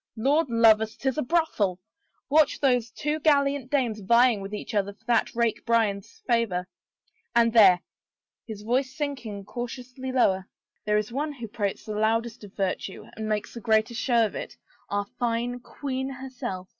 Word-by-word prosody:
Lord 280 +6 +2
love 225 -2 +6
us, 220 0 -4
'tis 265 +2 -1
a - - +2
brothel 245 - +1
I 180 - -53 0.5
Watch 305 -1 +4
those 245 -4 +2
two 300 +7 -2
gallant 280 -3 +2
dames 250 -7 0
vying 235 +2 +4
with 195 +1 -7
each 210 +2 -6
other 200 -1 0
for 200 - -34
that 235 -1 +1
rake 235 -1 0
Bryan's 220 -4 0
favor 225 -7 +1 0.7
I - - +6
And 230 -1 +2
there 195 -6 +7 0.3
— - - -68
" - - -66
his 210 -2 -7
voice 260 +5 0
sinking 245 -9 -4
cau 240 +3 -4
tiously 255 +2 -7
lower 190 -7 +2 0.2
— - - -51
there 210 0 +3
is 210 0 -1
the - - -12
one 295 +3 -2
who 240 -5 -7
prates 205 -2 -3
the 215 - -4
loudest 220 +2 0
of 205 -1 -12
virtue 195 0 -3
and 220 0 -4
makes 210 -1 -2
the 235 - -8
greatest 220 +2 +1
show 235 -3 +3
of 210 - -4
it - - -7 0.2
— - - -34
our 205 0 -1
fine 240 0 -1
queen 265 +1 -4
herself. 250 -8 -6
230 Hz, 195 wpm, -26 LUFS, 210-260 Hz, 0.7 s, there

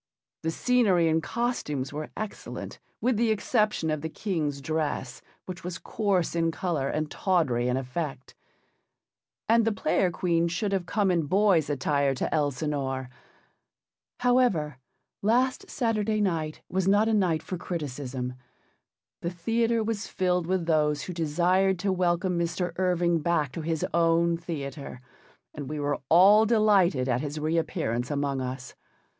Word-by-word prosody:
The 160 - -1
scenery 195 -3 +3
and 160 0 +2
costumes 150 - -2
were 150 +1 -5
excellent 215 -1 -6 0.2
with 245 -2 +2
the 230 0 +2
exception 215 -6 +1
of 155 -1 -2
the 160 - -3
King's 155 -7 -2
dress, 145 -3 -3 0.2
which 185 0 -7
was 180 0 -4
coarse 195 -6 -1
in 165 -1 +2
colour 160 -5 -2
and 155 0 -2
tawdry 150 - +1
in 125 +1 +1
effect. 135 +1 -5 1.1
And 230 +1 +4
the 225 - +2
Player 195 -2 +1
Queen 170 -1 +1
should 180 +4 -2
have 190 -3 -1
come 200 -3 +1
in 165 -4 0
boy's 190 -3 +3
attire 140 0 +1
to - - -2
Elsinore. 140 -3 -1 1.1
However, 240 - +2 0.4
last 250 +5 +1
Saturday 220 -3 0
night 165 -6 -1
was 185 0 -1
not 205 +3 +4
a 225 - +2
night 175 -7 +1
for 185 - -5
criticism. 135 -7 -4 0.9
The 170 - -1
theatre 225 +6 0
was 215 -1 -3
filled 180 -2 0
with 185 -2 0
those 150 -3 +1
who 180 - -5
desired 180 +4 +2
to 195 +2 0
welcome 180 0 +1
Mr. 175 +1 -1
Irving 175 -2 +2
back 155 -4 0
to 165 - -5
his 160 0 -1
own 170 0 +3
theatre, 150 -6 -6 0.5
and 145 -3 -6
we 150 0 -4
were 145 0 -1
all 200 +6 +7
delighted 200 - +3
at 125 -1 +1
his 150 +1 -4
re 155 +2 0
appearance 120 -6 -2
among 140 -2 -1
us. 130 0 -5
170 Hz, 150 wpm, -27 LUFS, 150-195 Hz, 1.1 s, all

